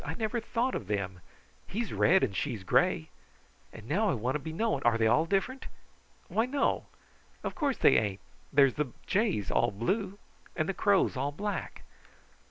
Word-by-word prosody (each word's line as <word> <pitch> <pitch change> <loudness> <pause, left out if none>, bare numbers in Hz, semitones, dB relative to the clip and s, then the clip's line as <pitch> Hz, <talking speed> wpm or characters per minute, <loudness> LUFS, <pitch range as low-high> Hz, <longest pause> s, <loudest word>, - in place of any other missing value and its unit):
I - - -4
never 230 +1 -1
thought 240 +3 -1
of 100 - -4
them! 100 -3 -2 0.5
He's 225 +3 -3
red 190 +2 +4
and 100 -7 -1
she's 105 -1 -2
gray 80 -3 +2 0.6
and 110 0 -12
now 205 - +1
I 175 - +1
want 125 +3 -1
to 150 - -1
be 160 +3 -6
knowing, 220 +7 0
are 120 -1 +3
they 115 - +2
all 155 +9 +3
different? 200 +9 -1 0.6
Why 225 +2 +1
no! 275 +2 0 0.6
Of - - -3
course, 285 -4 -1
they - - +5
ain't! 100 -2 0 0.3
There's 135 -2 +5
the 145 -5 -3
jays 200 - 0
all - - +3
blue, 190 - -2 0.4
and 155 - 0
the 195 - -1
crows 195 -4 +2
all 140 +2 -1
black." 205 +7 -4
160 Hz, 180 wpm, -30 LUFS, -, 0.6 s, they